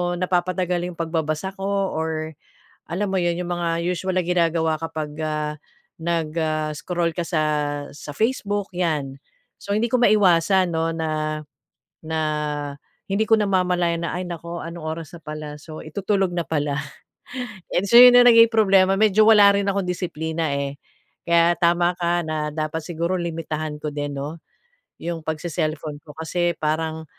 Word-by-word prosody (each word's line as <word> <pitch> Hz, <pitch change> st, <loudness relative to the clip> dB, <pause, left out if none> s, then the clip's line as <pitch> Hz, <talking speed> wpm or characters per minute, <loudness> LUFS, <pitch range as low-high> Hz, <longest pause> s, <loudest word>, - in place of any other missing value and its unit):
napapatagal 180 Hz, 0 st, 0 dB
yung 180 Hz, -, -8 dB
pagbabasa 160 Hz, +2 st, -2 dB
ko 195 Hz, 0 st, 0 dB
or 160 Hz, 0 st, -2 dB, 0.6 s
alam 195 Hz, +4 st, -1 dB
mo 190 Hz, -, -2 dB
yun 175 Hz, -1 st, 0 dB
yung 180 Hz, -, -3 dB
mga 170 Hz, -1 st, -1 dB
usual 180 Hz, +1 st, -2 dB
na 180 Hz, -, 0 dB
ginagawa 165 Hz, -2 st, +2 dB
kapag, 155 Hz, -2 st, -5 dB
ah, 150 Hz, -1 st, -2 dB, 0.4 s
nag, 165 Hz, -1 st, -2 dB
ah, 155 Hz, -1 st, -1 dB
scroll 170 Hz, +1 st, -2 dB
ka 175 Hz, -, -1 dB
sa 160 Hz, -2 st, 0 dB, 0.5 s
sa 145 Hz, -, -8 dB
Facebook, 205 Hz, -, -1 dB
yan. 155 Hz, -6 st, -1 dB, 0.5 s
So 200 Hz, -, -6 dB
hindi 235 Hz, +2 st, +1 dB
ko 250 Hz, -, +3 dB
maiwasan 190 Hz, -4 st, +4 dB
'no 160 Hz, 0 st, 0 dB
na 155 Hz, -1 st, -2 dB, 0.7 s
na 160 Hz, 0 st, -1 dB, 0.9 s
hindi 215 Hz, +3 st, +1 dB
ko 225 Hz, -, +5 dB
namamalayan 180 Hz, -4 st, +1 dB
na, -, -, -3 dB
"Ay 180 Hz, -, -2 dB
naku 170 Hz, 0 st, -6 dB
anong 170 Hz, +1 st, -7 dB
oras 160 Hz, 0 st, -5 dB
na -, -, -23 dB
pala, 150 Hz, 0 st, -6 dB
so 155 Hz, +1 st, -10 dB
itutulog 195 Hz, +3 st, -1 dB
na 170 Hz, -3 st, -2 dB
pala," 145 Hz, -2 st, -1 dB, 0.9 s
and 195 Hz, +3 st, 0 dB
so 235 Hz, -, +2 dB
yun 250 Hz, 0 st, +11 dB
na 245 Hz, 0 st, +8 dB
naging 230 Hz, -1 st, +7 dB
problema, 195 Hz, -3 st, +4 dB
medyo 215 Hz, 0 st, +5 dB
wala 205 Hz, -2 st, +8 dB
rin 200 Hz, -, +1 dB
akong 195 Hz, -2 st, 0 dB
disiplina, 160 Hz, -3 st, -2 dB
eh. 140 Hz, 0 st, -2 dB, 0.5 s
Kaya 170 Hz, 0 st, +4 dB
tama 175 Hz, +1 st, +2 dB
ka 175 Hz, 0 st, +1 dB
na 155 Hz, -1 st, -2 dB
dapat 155 Hz, +1 st, -3 dB
siguro 170 Hz, +3 st, -2 dB
limitahan 160 Hz, -3 st, -4 dB
ko 150 Hz, -, -3 dB
din 145 Hz, -1 st, -3 dB
'no, 155 Hz, +4 st, -6 dB, 0.6 s
yung 170 Hz, 0 st, -4 dB
pag-ce-celllphone 155 Hz, -2 st, -3 dB
ko 150 Hz, -1 st, -14 dB
kasi 170 Hz, +1 st, -1 dB
parang 160 Hz, +1 st, -2 dB
170 Hz, 155 wpm, -23 LUFS, 155-185 Hz, 0.9 s, yun